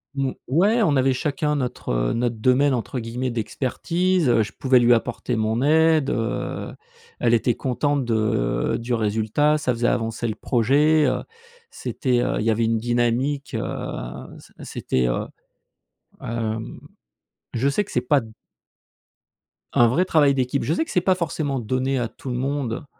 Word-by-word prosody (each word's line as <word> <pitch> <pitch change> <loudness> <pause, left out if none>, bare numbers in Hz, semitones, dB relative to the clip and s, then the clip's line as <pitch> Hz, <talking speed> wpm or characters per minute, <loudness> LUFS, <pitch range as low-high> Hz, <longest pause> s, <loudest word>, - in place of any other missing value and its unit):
Mmh, 135 -1 0 0.2
ouais, 200 - +3
on 160 -9 +3
avait 130 0 +3
chacun 150 +2 -1
notre, 130 -4 -4
heu, - - 0
notre 120 0 -1
domaine, 130 +5 +3
entre 125 +1 -3
guillemets, 120 +3 -3
«d'expertise», 155 - -1
heu, 115 - +4
je 110 - -3
pouvais 130 -2 +3
lui 120 0 +5
apporter 120 +1 -1
mon 110 +1 0
aide, 155 0 +4
heu, 115 +1 -3 0.5
elle 120 -1 +2
était 120 +1 +1
contente 140 +2 -1
de 110 - 0
du 120 +1 -3
résultat, 110 +8 +1
ça 130 - 0
faisait 120 0 0
avancer 115 +1 -1
le 110 - -1
projet, 145 +7 +3
heu, 130 - 0 0.5
c'était, 125 - -1
heu, 125 - 0
il - - -1
y - - +2
avait 115 +1 +2
une 115 0 +1
dynamique, 120 +5 0
heu, 110 - -1 0.8
c - - -18
c'était, 65 -1 -1
heu, - - -1 0.9
hem, 115 -1 -4 0.7
je 130 +4 +1
sais 205 +9 +1
que - - -14
c'est 125 - +1
pas 140 +3 +3
d 110 -1 -12 1.4
un 120 - +5
vrai 130 +10 +2
travail 150 -5 +4
d'équipe, 130 +1 -1
je 155 - 0
sais 320 - +1
que 325 - -13
c'est 180 - +3
pas 185 +1 +3
forcément 155 -6 -2
donné 130 +3 -1
à 120 - -1
tout 125 +3 -8
le - - -2
monde, 135 -1 -2
125 Hz, 170 wpm, -23 LUFS, 115-145 Hz, 1.4 s, lui